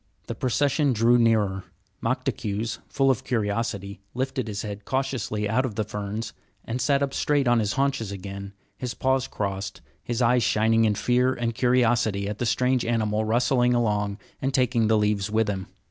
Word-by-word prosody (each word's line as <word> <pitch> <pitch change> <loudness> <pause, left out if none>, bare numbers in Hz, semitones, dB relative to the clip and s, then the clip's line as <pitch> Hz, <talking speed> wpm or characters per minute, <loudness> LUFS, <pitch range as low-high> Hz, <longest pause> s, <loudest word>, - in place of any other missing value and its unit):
The - - -4
procession 140 +2 +1
drew 120 +2 +4
nearer. 105 -5 +2 0.4
Moktaques, 105 +3 -2
full 135 -1 +3
of 130 - -2
curiosity, 105 -3 -2
lifted 130 -1 -2
his 105 -1 -4
head 105 -1 -6
cautiously 130 -6 -2
out 110 +5 +1
of 125 -6 -3
the 110 - 0
ferns 105 +1 -5 0.3
and 120 +2 -3
sat 140 -1 +2
up 140 - -2
straight 145 -3 +1
on 120 -1 +4
his 105 -2 0
haunches 135 -6 0
again, 100 0 -7 0.2
his 125 +3 -5
paws 130 0 +1
crossed, 100 -1 -4 0.2
his 120 -1 -3
eyes 125 0 +4
shining 115 +1 +3
in 105 -1 +2
fear 125 +4 +2
and 115 -1 -2
curiosity 120 -5 +2
at 105 0 -4
the 120 - 0
strange 125 +1 +2
animal 110 -2 0
rustling 125 +2 +2
along 105 -3 0 0.2
and 135 0 0
taking 120 -3 +2
the 110 0 +4
leaves 105 -2 +1
with 110 0 +1
him. 95 -2 -3
115 Hz, 175 wpm, -25 LUFS, 105-125 Hz, 0.4 s, drew